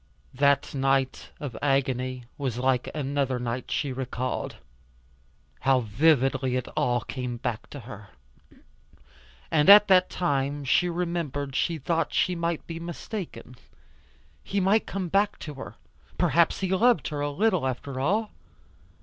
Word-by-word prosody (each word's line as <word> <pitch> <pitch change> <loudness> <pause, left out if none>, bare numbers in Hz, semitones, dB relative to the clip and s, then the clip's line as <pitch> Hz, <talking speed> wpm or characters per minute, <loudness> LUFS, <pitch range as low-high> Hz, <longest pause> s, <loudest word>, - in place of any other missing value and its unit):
That 140 +1 +2
night 135 -1 0
of 135 -6 -6
agony 130 -2 0
was 130 -5 -3
like 125 0 +1
another 140 -3 -1
night 125 +1 -4
she 140 -3 -1
recalled. 130 -1 -3 1.0
How 130 -1 +3
vividly 130 +2 +2
it 130 -1 -2
all 120 -1 +1
came 125 +1 -5
back 120 -1 -4
to 145 - -8
her. 105 -3 -11 1.4
And 150 +3 +4
at 210 +1 +10
that 185 -1 +5
time 145 -4 -1
she 175 +7 +3
remembered 165 -6 -3
she 170 -2 0
thought 165 +3 -1
she 180 - +2
might 170 -1 -2
be 165 -1 -6
mistaken. 170 - -7 0.9
He 200 - -1
might 195 +4 +2
come 190 -2 -3
back 200 +4 +1
to 150 - -7
her. 135 - -9 0.4
Perhaps 170 +3 +2
he 190 - -1
loved 235 +5 +3
her, 145 -2 -4
a 145 - 0
little, 185 -2 +1
after 130 +1 -4
all. 205 +10 0
140 Hz, 140 wpm, -26 LUFS, 130-170 Hz, 1.4 s, at